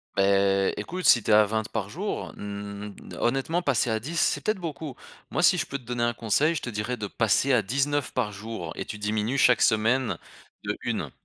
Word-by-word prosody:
Beh, 100 0 +3
écoute, 180 - -5
si 120 - +7
tu - - 0
es - - +7
à 105 0 +8
20 110 +1 -2
par 100 -1 -3
jour, 195 - -4
mmh, 100 0 -6 0.3
honnêtement, 135 +8 0
passer 135 -6 +1
à 110 0 0
10, 160 +9 -5
c'est 145 - +2
peut-être 215 +4 -1
beaucoup. 155 -5 -6 0.3
Moi, 155 - -1
si 180 0 +6
je 145 - 0
peux 140 - -4
te 130 - -18
donner 120 0 -2
un 120 0 +1
conseil, 140 +9 +1
je - - -2
te 120 - -5
dirais 105 +3 -3
de 105 -3 -5
passer 115 +6 +2
à 120 -4 +4
19 140 +5 0
par 115 -5 0
jour, 100 -5 -6
et - - -3
tu 105 - -6
diminues 105 +5 -1
chaque 125 -3 +5
semaine 110 -2 +2 0.5
de - - -2
1. - - -2
115 Hz, 220 wpm, -26 LUFS, 105-140 Hz, 0.5 s, à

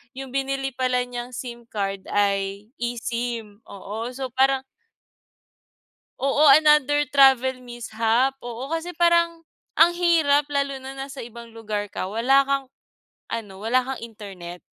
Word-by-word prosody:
yung 265 -1 -7
binili 270 0 -2
pala 250 0 0
niyang 245 0 -7
SIM 240 -2 -7
card 195 -3 -4
ay 200 +1 -1
eSIM. 235 -3 -4
Oo, 210 +3 -6
so 260 -1 -5
parang 265 +1 +2 1.6
Oo, 280 +2 +4
another 295 0 +5
travel 260 -2 +5
mishap. 240 +1 0
Oo, 240 +1 -6
kasi 330 +2 -3
parang 340 -1 +3 0.3
ang 340 +2 +6
hirap 320 -5 +3
lalo 280 -2 -1
na 265 +1 -8
nasa 270 +1 -6
ibang 235 0 -11
lugar 210 -2 -3
ka 185 - -3
wala 245 +6 +4
kang 275 0 -1 0.6
ano, 210 -4 -5
wala 245 +3 +2
kang 265 -1 -5
internet. 195 -6 -9
250 Hz, 130 wpm, -24 LUFS, 225-275 Hz, 1.6 s, ang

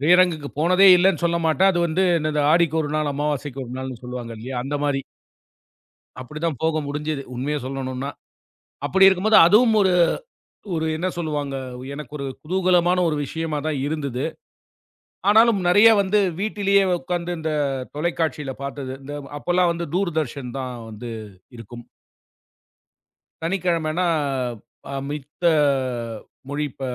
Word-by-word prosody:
திரையரங்குக்கு 170 -3 +4
போனதே 185 +4 +6
இல்லன்னு 180 -2 +2
சொல்லமாட்டேன். 170 +2 +3
அது 175 - -1
வந்து 175 +4 +1 0.2
இந்த 150 -1 0
"ஆடிக்கொரு 160 -2 +2
நாள் 150 -1 0
அமாவாசைக்கு 145 -2 -3
ஒரு 120 - -9
நாள்னு" 130 -3 -6
சொல்லுவாங்க 125 -1 -6
இல்லையா? 125 +3 -6
அந்த 145 +2 -2
மாரி. 135 -2 0 1.2
அப்டித்தான் 155 +2 -4
போக 160 -1 +1
முடிஞ்சது 150 0 -3
உண்மைய 145 +4 -1
சொல்லணும்னா. 135 0 -4 0.8
அப்டி 190 +8 +5
இருக்கும்போது 210 +4 +4
அதுவும் 220 +4 +5
ஒரு 190 -1 +3 0.8
ஒரு 160 0 -1
என்ன 175 +3 -1
சொல்லுவாங்க? 150 -4 -3 0.4
எனக்கு 150 0 -8
ஒரு 140 - -5 0.2
குதூகலமான 180 +1 +2
ஒரு 150 - -1
விஷயமாதான் 155 -1 -3
இருந்தது. 140 -4 -3 1.1
ஆனாலும் 220 0 +5
நறைய 205 +5 +7
வந்து 200 +2 +2 0.2
வீட்டிலேயே 200 -2 +2 0.2
உக்காந்து 175 0 -3
இந்தத் 145 -5 -2
தொலைக்காட்சியில 155 -3 -2
பாத்தது. 140 -1 -5
இந்த 145 +2 -7 0.2
அப்பல்லாம் 175 +1 +2
வந்து 170 -1 -4
தூர்தர்ஷன் 155 -9 -2
தான் 130 -1 -5
வந்து 110 +2 -8 0.5
இருக்கும். 120 +1 -10 1.6
சனிக்கிழமன்னா 170 -1 0 0.9
அ - - -3
மித்த 150 +3 -8 1.1
மொழிப் 145 -1 -3
ப - - -12
155 Hz, 120 wpm, -22 LUFS, 140-180 Hz, 1.6 s, நறைய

